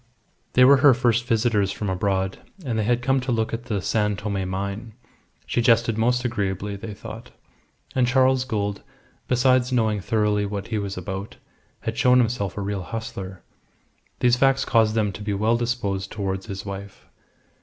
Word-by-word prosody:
They 125 - +7
were 140 +2 +7
her 135 -1 +6
first 120 -2 +1
visitors 110 -4 +2
from 105 +1 -4
abroad, 95 0 -1 0.3
and 115 -4 -1
they 105 - 0
had 120 +1 +1
come 135 +1 +2
to 130 0 -3
look 110 -1 0
at 115 +1 -4
the 105 -5 -2
San 105 -2 +1
Tome 100 -2 -3
mine. 100 +4 -4 0.5
She 120 - 0
jested 115 -1 +3
most 125 +3 +1
agreeably, 100 -3 -2
they 105 +1 -7
thought; 110 +3 -9 0.6
and 125 -2 +2
Charles 130 0 +3
Gould, 105 -5 -2 0.5
besides 125 0 +3
knowing 110 -4 +1
thoroughly 105 0 +1
what 100 -1 -5
he 110 -2 -1
was 100 -2 -4
about, 95 +2 -6 0.4
had 115 0 -4
shown 125 0 +5
himself 115 -6 0
a - - -2
real 100 -1 -2
hustler. 95 -2 -6 0.8
These 125 0 +4
facts 135 +1 +3
caused 110 -2 +3
them 105 -2 +1
to 100 - -9
be 105 -1 -2
well 110 +4 +2
disposed 110 -5 -2
towards 95 0 -3
his 100 -2 -6
wife. 100 0 -8
110 Hz, 175 wpm, -24 LUFS, 100-120 Hz, 0.8 s, They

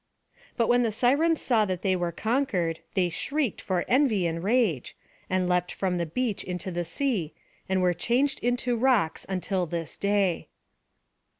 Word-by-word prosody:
But 230 -2 +2
when 245 0 +4
the 230 -2 +1
Sirens 285 +9 +2
saw 230 -4 +3
that 185 -2 -3
they 190 -1 +2
were 175 -1 -1
conquered, 190 - -1 0.2
they 185 -2 +3
shrieked 275 - -2
for 185 -2 -1
envy 245 -8 +3
and 165 0 -2
rage, 205 - +1 0.3
and 185 -1 +1
leapt 180 0 +1
from 180 -2 -1
the 170 - -1
beach 225 +5 -2
into 180 +1 -4
the 175 0 -2
sea, 185 - -2 0.3
and 190 -1 +1
were 180 -1 +3
changed 245 +10 +1
into 245 +1 0
rocks 230 -9 +1
until 185 -1 -1
this 165 0 -4
day. 200 -4 0
190 Hz, 165 wpm, -27 LUFS, 175-245 Hz, 0.3 s, when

